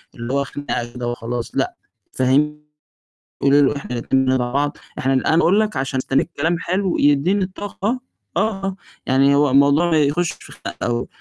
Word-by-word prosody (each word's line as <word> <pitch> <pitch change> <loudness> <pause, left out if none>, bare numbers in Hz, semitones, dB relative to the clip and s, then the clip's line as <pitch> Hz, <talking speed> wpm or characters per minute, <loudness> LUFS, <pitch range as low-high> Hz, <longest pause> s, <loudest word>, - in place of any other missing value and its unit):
اللي 120 +2 -5
هو، 140 0 +2
خناقة 120 -4 -4
كده 125 -1 -4
وخلاص، 120 0 -4
لأ، - - 0 0.4
فهميه 150 +4 +1 0.8
قولي 140 +1 +5
له 145 +1 +3
إحنا 140 - -8
الاتنين 130 +3 +1
بندعم 130 0 +2 0.2
بعض، 145 +1 0 0.2
إحنا 135 +1 +1
أنا 135 +4 +2
أقول 195 +5 +4
لك 215 0 -2
عشان 130 0 -2
مستنِّية 135 +4 +1
كلام 165 +3 +1
حلو 185 0 -1
يدِّيني 145 +8 +3
الطاقة 205 +5 -4 0.4
آه، 195 -3 -1 0.3
يعني 135 +2 +4
هو 145 -1 +4
الموضوع 140 +5 +4
ما 160 - +4
يخُشش 160 +4 +1
في - - -14
خناق - - -8
أوي. 120 0 -1
145 Hz, 170 wpm, -20 LUFS, 130-175 Hz, 0.8 s, قولي